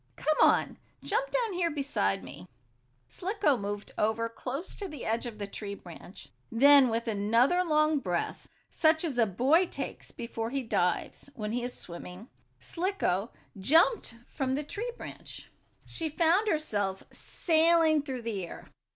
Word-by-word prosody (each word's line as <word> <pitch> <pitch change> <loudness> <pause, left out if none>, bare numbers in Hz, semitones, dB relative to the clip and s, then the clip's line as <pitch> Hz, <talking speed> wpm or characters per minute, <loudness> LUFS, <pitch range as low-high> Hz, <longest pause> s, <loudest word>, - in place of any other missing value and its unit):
"Come 310 0 0
on; - - +4 0.3
jump 485 +5 0
down 475 -5 0
here 350 -1 +1
beside 100 - -1
me!" 90 +1 -10 0.6
Slicko 355 - 0
moved 205 -2 -5
over 220 +2 +1
close 270 +9 -5
to 400 - -4
the 300 -7 -8
edge 230 +2 -1
of 225 -3 -8
the 205 - -4
tree 200 0 -6
branch. - - -12 0.2
Then, 275 +2 +7
with 230 +1 -2
another 230 - +3
long 305 -2 +2
breath, 180 -8 -3 0.2
such 315 0 +3
as 285 -8 -2
a 225 - +4
boy 275 - +3
takes - - -6
before 230 -1 -5
he 270 +1 -2
dives, 195 +3 -1
when 210 -2 -4
he 245 +2 -1
is 245 +1 -4
in - - -7
swimming, 180 +5 -9 0.3
Slicko 335 - -1 0.3
jumped 320 - +3
from 265 -3 -2
the 295 - -2
tree 440 +11 -4
branch. - - -10 0.3
She 325 -1 -3
found 340 +7 +2
herself 205 - -1
sailing 325 -2 +3
through 260 -4 -6
the 215 -5 -3
air. 170 - -9
260 Hz, 155 wpm, -29 LUFS, 215-320 Hz, 0.6 s, Then